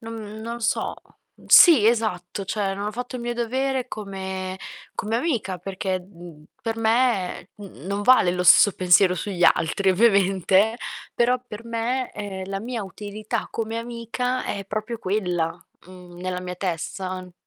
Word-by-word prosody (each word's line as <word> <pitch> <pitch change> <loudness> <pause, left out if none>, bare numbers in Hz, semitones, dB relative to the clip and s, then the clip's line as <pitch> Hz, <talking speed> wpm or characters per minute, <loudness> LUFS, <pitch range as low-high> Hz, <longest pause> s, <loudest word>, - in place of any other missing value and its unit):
non 220 -2 -8
non 235 +1 -5
so; - - 0 0.5
sì, 300 - +8
esatto, 210 -5 0
cioè 195 0 -2
non 205 +1 -3
ho - - -6
fatto 245 +2 -5
il 240 - -6
mio 240 0 -2
dovere 255 +2 -1
come 190 -2 -5 0.4
come 220 +2 -2
amica 235 - -1
perché, 190 +1 -3
mhmm, 175 -4 -14 0.2
per 225 -1 -3
me, 225 -5 +1
mhmm, 185 - -12
non 200 +1 -2
vale 225 -7 +5
lo 180 0 -1
stesso 200 +3 +7
pensiero 180 0 +4
sugli 185 -1 -1
altri, 190 +4 0
ovviamente, 195 +1 +3 0.4
però 245 +1 +2
per 215 +1 -9
me, 235 +2 -2
ehm, 195 -2 -6
la 195 0 -3
mia 230 -2 -4
utilità 210 +2 -5
come 225 0 -3
amica 240 +2 -3
è 200 -1 -4
proprio 215 +3 -4
quella, 180 -4 -1 0.3
mhmm, 180 -1 -13
nella 180 0 -3
mia 180 0 -5
testa. 185 +1 -4
205 Hz, 150 wpm, -24 LUFS, 185-230 Hz, 0.5 s, sì